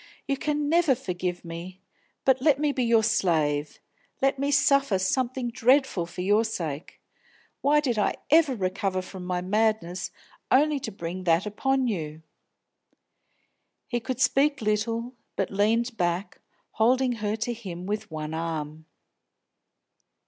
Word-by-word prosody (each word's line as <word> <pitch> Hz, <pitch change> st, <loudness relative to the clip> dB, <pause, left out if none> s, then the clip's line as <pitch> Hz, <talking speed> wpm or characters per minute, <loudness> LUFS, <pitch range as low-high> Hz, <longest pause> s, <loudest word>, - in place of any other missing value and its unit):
You 275 Hz, -, +1 dB
can 295 Hz, +1 st, -1 dB
never 325 Hz, -3 st, +4 dB
forgive 180 Hz, -7 st, -4 dB
me; 170 Hz, +3 st, -8 dB, 0.5 s
but 265 Hz, -1 st, +4 dB
let 290 Hz, -1 st, +4 dB
me 295 Hz, 0 st, +1 dB
be 265 Hz, -3 st, -1 dB
your 230 Hz, -2 st, +4 dB
slave, 155 Hz, -9 st, +1 dB, 0.4 s
let 270 Hz, 0 st, +1 dB
me 280 Hz, +1 st, 0 dB
suffer 275 Hz, -6 st, +3 dB
something 245 Hz, +5 st, -1 dB
dreadful 255 Hz, -7 st, +2 dB
for 175 Hz, -, -6 dB
your 205 Hz, +4 st, +3 dB
sake! 165 Hz, -9 st, -5 dB, 0.6 s
Why 295 Hz, +2 st, +4 dB
did 245 Hz, -7 st, 0 dB
I -, -, +1 dB, 0.2 s
ever 310 Hz, -4 st, +5 dB
recover 185 Hz, -1 st, -1 dB
from 185 Hz, 0 st, -9 dB
my 180 Hz, 0 st, -2 dB
madness, 195 Hz, -2 st, 0 dB, 0.4 s
only 295 Hz, +2 st, +4 dB
to 220 Hz, -, -5 dB
bring 185 Hz, -1 st, -6 dB
that 170 Hz, +2 st, +3 dB
upon 265 Hz, +6 st, 0 dB
you!" 160 Hz, -7 st, -4 dB, 1.6 s
He 240 Hz, -, -1 dB
could 255 Hz, +1 st, -4 dB
speak 280 Hz, +1 st, +3 dB
little, 225 Hz, +3 st, -1 dB, 0.2 s
but -, -, -1 dB
leaned 225 Hz, +4 st, +1 dB
back, 175 Hz, +2 st, -2 dB, 0.3 s
holding 250 Hz, +3 st, +2 dB
her 210 Hz, 0 st, 0 dB
to 225 Hz, +2 st, -2 dB
him 185 Hz, -6 st, -7 dB
with 210 Hz, +2 st, -3 dB
one 155 Hz, -1 st, -5 dB
arm. 160 Hz, -1 st, -4 dB
215 Hz, 140 wpm, -26 LUFS, 180-265 Hz, 1.6 s, ever